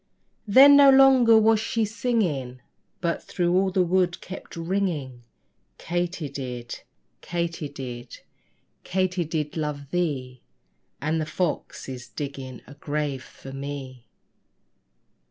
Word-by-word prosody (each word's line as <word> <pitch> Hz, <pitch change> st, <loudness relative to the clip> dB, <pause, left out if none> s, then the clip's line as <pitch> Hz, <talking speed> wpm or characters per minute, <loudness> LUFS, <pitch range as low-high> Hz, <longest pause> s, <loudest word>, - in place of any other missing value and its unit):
Then 270 Hz, +7 st, +8 dB
no 280 Hz, -1 st, +8 dB
longer 265 Hz, -4 st, +7 dB, 0.2 s
she 225 Hz, +2 st, -1 dB
was 215 Hz, 0 st, -1 dB
singing, 155 Hz, -, -1 dB, 0.4 s
But 170 Hz, -2 st, -1 dB
through 175 Hz, -1 st, -1 dB
all 190 Hz, +1 st, +3 dB
the 185 Hz, -1 st, +2 dB
wood 180 Hz, 0 st, +1 dB
kept 190 Hz, -, -9 dB
ringing 165 Hz, -8 st, -2 dB, 0.6 s
Katy 175 Hz, -1 st, -2 dB
did, 125 Hz, -3 st, -6 dB, 0.4 s
Katy 170 Hz, -3 st, -3 dB
did, 125 Hz, -4 st, -8 dB, 0.6 s
Katy 185 Hz, -1 st, 0 dB
did 150 Hz, -2 st, -3 dB
love 150 Hz, -3 st, -4 dB
thee 135 Hz, -8 st, -2 dB, 0.6 s
And 155 Hz, +3 st, -1 dB
the 155 Hz, -, -3 dB
fox 170 Hz, +2 st, -3 dB
is 125 Hz, -1 st, -7 dB
digging 130 Hz, +1 st, -7 dB
a -, -, -12 dB
grave 145 Hz, -2 st, -3 dB
for 135 Hz, -, -12 dB
me. 135 Hz, -3 st, -7 dB
155 Hz, 120 wpm, -25 LUFS, 135-185 Hz, 0.6 s, Then